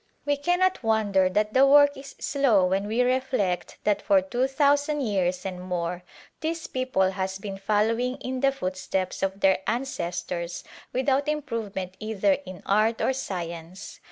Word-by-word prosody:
We 290 Hz, 0 st, +2 dB
cannot 355 Hz, +5 st, +1 dB
won 220 Hz, -3 st, +1 dB
der 190 Hz, -1 st, +4 dB
that 210 Hz, +3 st, 0 dB
the 265 Hz, -, +5 dB
work 285 Hz, 0 st, +6 dB
is 275 Hz, +1 st, -11 dB
slow 245 Hz, -10 st, +2 dB
when 190 Hz, +2 st, 0 dB
we 230 Hz, +4 st, +2 dB
reflect 255 Hz, -8 st, -1 dB
that 205 Hz, -1 st, +1 dB
for 195 Hz, -, +4 dB
two 240 Hz, +8 st, -1 dB
thousand 285 Hz, +2 st, +2 dB
years 185 Hz, -6 st, 0 dB
and 185 Hz, -2 st, -4 dB
more 180 Hz, -1 st, -3 dB, 0.4 s
this 325 Hz, +1 st, -3 dB
people 255 Hz, -8 st, 0 dB
has 190 Hz, 0 st, -3 dB
been 195 Hz, -1 st, -7 dB
following 220 Hz, +5 st, +1 dB
in 255 Hz, 0 st, -4 dB
the 275 Hz, +1 st, +3 dB
footsteps 185 Hz, -5 st, -3 dB
of 195 Hz, 0 st, -2 dB
their 190 Hz, -1 st, +4 dB
ancestors 175 Hz, -8 st, -3 dB, 0.3 s
without 265 Hz, +3 st, +1 dB
improvement 220 Hz, -11 st, -3 dB
either 220 Hz, +6 st, +1 dB, 0.2 s
in 185 Hz, -1 st, -9 dB
art 215 Hz, +3 st, +2 dB
or 265 Hz, -, +1 dB
science. 170 Hz, -6 st, -6 dB
215 Hz, 155 wpm, -26 LUFS, 190-265 Hz, 0.4 s, work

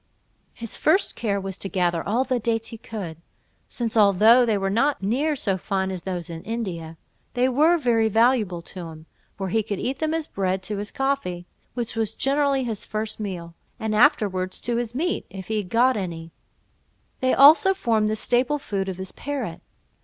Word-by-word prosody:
His 230 Hz, -2 st, -6 dB
first 370 Hz, +6 st, +2 dB
care 200 Hz, -4 st, -1 dB
was 195 Hz, -1 st, -6 dB
to 195 Hz, -, -3 dB
gather 175 Hz, -3 st, 0 dB
all 235 Hz, +6 st, +1 dB
the 255 Hz, -2 st, -1 dB
dates 225 Hz, 0 st, -1 dB
he 230 Hz, -, -8 dB
could, 195 Hz, -9 st, -6 dB, 0.5 s
since 235 Hz, -2 st, -4 dB
although 220 Hz, +4 st, +6 dB
they 215 Hz, -2 st, +2 dB
were 195 Hz, 0 st, -1 dB
not 250 Hz, +2 st, +1 dB
near 280 Hz, +10 st, +1 dB
so 195 Hz, -8 st, -1 dB
fine 190 Hz, 0 st, -1 dB
as 185 Hz, -2 st, -5 dB
those 180 Hz, -2 st, -4 dB
in 165 Hz, -1 st, -7 dB
India, 175 Hz, -8 st, -5 dB, 0.4 s
they 250 Hz, +1 st, +3 dB
were 305 Hz, +7 st, +4 dB
very 230 Hz, -6 st, +2 dB
valuable 220 Hz, -6 st, +2 dB
to 175 Hz, 0 st, -8 dB
him, 160 Hz, -1 st, -11 dB, 0.3 s
for 195 Hz, -2 st, -3 dB
he 225 Hz, -, +1 dB
eat 220 Hz, +6 st, -3 dB
them 315 Hz, 0 st, 0 dB
as 325 Hz, -2 st, -2 dB
bread 190 Hz, -4 st, -2 dB
to 205 Hz, +1 st, -4 dB
his 205 Hz, +1 st, -4 dB
coffee, 270 Hz, -11 st, -2 dB, 0.3 s
which 240 Hz, -2 st, -3 dB
was 220 Hz, -1 st, -1 dB
generally 275 Hz, -1 st, +1 dB
his 225 Hz, -4 st, -4 dB
first 215 Hz, 0 st, -4 dB
meal, 180 Hz, -5 st, -5 dB, 0.3 s
and 220 Hz, -2 st, -2 dB
afterwards 205 Hz, -7 st, +2 dB
to 235 Hz, 0 st, -1 dB
his 240 Hz, 0 st, -3 dB
meat, 350 Hz, +6 st, -1 dB
if 190 Hz, +1 st, -9 dB
he 220 Hz, -, 0 dB
had 200 Hz, -4 st, -3 dB
got 250 Hz, +4 st, +3 dB
any: 170 Hz, -5 st, -5 dB, 0.9 s
they 255 Hz, -1 st, +2 dB
also 325 Hz, +8 st, +7 dB
formed 225 Hz, -, +1 dB
the 215 Hz, -, 0 dB
staple 250 Hz, +6 st, +1 dB
food 195 Hz, -8 st, -3 dB
of 185 Hz, -, -5 dB
his 190 Hz, 0 st, -6 dB
parrot. 265 Hz, -12 st, -5 dB
220 Hz, 190 wpm, -24 LUFS, 190-250 Hz, 0.9 s, also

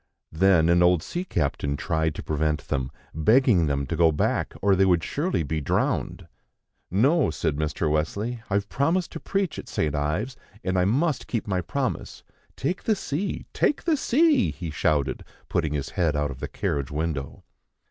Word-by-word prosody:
Then 85 Hz, -1 st, +4 dB
an 85 Hz, +1 st, +4 dB
old 90 Hz, -2 st, +4 dB
sea 175 Hz, -, -3 dB
captain 70 Hz, -, -1 dB
tried 80 Hz, 0 st, 0 dB
to -, -, -6 dB
prevent 75 Hz, 0 st, -1 dB
them, 65 Hz, -1 st, -1 dB, 0.2 s
begging 100 Hz, -, +4 dB
them 70 Hz, -1 st, 0 dB
to -, -, -3 dB
go 80 Hz, -2 st, +4 dB
back, 75 Hz, -, 0 dB
or 100 Hz, 0 st, +3 dB
they 95 Hz, -, +4 dB
would 90 Hz, -3 st, +3 dB
surely 150 Hz, -, -1 dB
be 75 Hz, +2 st, -2 dB
drowned. 70 Hz, -, -1 dB, 0.6 s
"No," 135 Hz, -, +3 dB
said 70 Hz, -, -1 dB
Mr. 75 Hz, +1 st, -1 dB
Wesley, 100 Hz, +11 st, -1 dB
"I've 100 Hz, 0 st, 0 dB
promised 165 Hz, -, 0 dB
to 160 Hz, -, -6 dB
preach 195 Hz, -2 st, -2 dB
at -, -, -9 dB
St. 75 Hz, -2 st, -1 dB
Ives, 80 Hz, -, -1 dB, 0.3 s
and 95 Hz, 0 st, -1 dB
I 90 Hz, -, +3 dB
must 135 Hz, -, +1 dB
keep 115 Hz, -4 st, -2 dB
my 95 Hz, -3 st, 0 dB
promise. 80 Hz, -, -3 dB, 0.3 s
Take 175 Hz, +8 st, -3 dB
the 220 Hz, -, +3 dB
sea! 190 Hz, +1 st, -3 dB
Take 295 Hz, -, +1 dB
the 330 Hz, -2 st, +2 dB
sea!" 290 Hz, 0 st, +3 dB
he 85 Hz, -3 st, -6 dB
shouted, 75 Hz, -2 st, 0 dB, 0.3 s
putting 80 Hz, -3 st, 0 dB
his 70 Hz, -3 st, -2 dB
head 80 Hz, -4 st, 0 dB
out 75 Hz, -1 st, 0 dB
of 65 Hz, -, -9 dB
the -, -, -4 dB
carriage 70 Hz, -3 st, -2 dB
window. 75 Hz, -2 st, -3 dB
90 Hz, 180 wpm, -25 LUFS, -, 0.6 s, Then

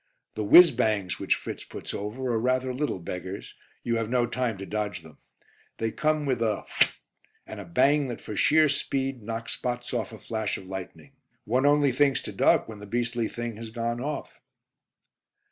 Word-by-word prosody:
The 110 Hz, -, -3 dB
"whizz 170 Hz, -, +9 dB
bangs" 105 Hz, -7 st, 0 dB
which -, -, +2 dB
Fritz -, -, -6 dB
puts -, -, -7 dB
over 120 Hz, +5 st, -3 dB
are 115 Hz, -, +1 dB
rather 130 Hz, +2 st, +1 dB
little 145 Hz, -4 st, -1 dB
beggars; 90 Hz, +2 st, -6 dB, 0.3 s
you 115 Hz, -1 st, 0 dB
have 115 Hz, -1 st, -2 dB
no 125 Hz, -1 st, +2 dB
time 120 Hz, -3 st, -2 dB
to 100 Hz, -, -6 dB
dodge 105 Hz, -4 st, -3 dB
them. 80 Hz, -1 st, -15 dB, 0.6 s
They 115 Hz, 0 st, -1 dB
come 155 Hz, +2 st, 0 dB
with 130 Hz, -4 st, 0 dB
a 110 Hz, -3 st, 0 dB
"phut" -, -, +2 dB, 0.5 s
and 110 Hz, -, -8 dB
a 100 Hz, -, -7 dB
bang 135 Hz, +11 st, +3 dB
that 120 Hz, -, -5 dB
for 105 Hz, -, -7 dB
sheer 155 Hz, +10 st, +5 dB
speed 135 Hz, -2 st, -1 dB
knocks 115 Hz, +2 st, -4 dB
spots 120 Hz, 0 st, -4 dB
off 120 Hz, -2 st, -2 dB
a 110 Hz, -, -9 dB
flash 110 Hz, -1 st, -3 dB
of 95 Hz, -, -11 dB
lightning. 95 Hz, +8 st, -8 dB, 0.3 s
One 130 Hz, +6 st, +2 dB
only 145 Hz, -1 st, +4 dB
thinks 140 Hz, +1 st, +2 dB
to -, -, -6 dB
duck -, -, +3 dB
when 110 Hz, -2 st, -9 dB
the 105 Hz, -, -10 dB
beastly 120 Hz, +1 st, -1 dB
thing 120 Hz, -2 st, -5 dB
has 115 Hz, 0 st, -7 dB
gone 120 Hz, +1 st, -2 dB
off. 145 Hz, +2 st, -5 dB
115 Hz, 190 wpm, -27 LUFS, 105-130 Hz, 0.6 s, whizz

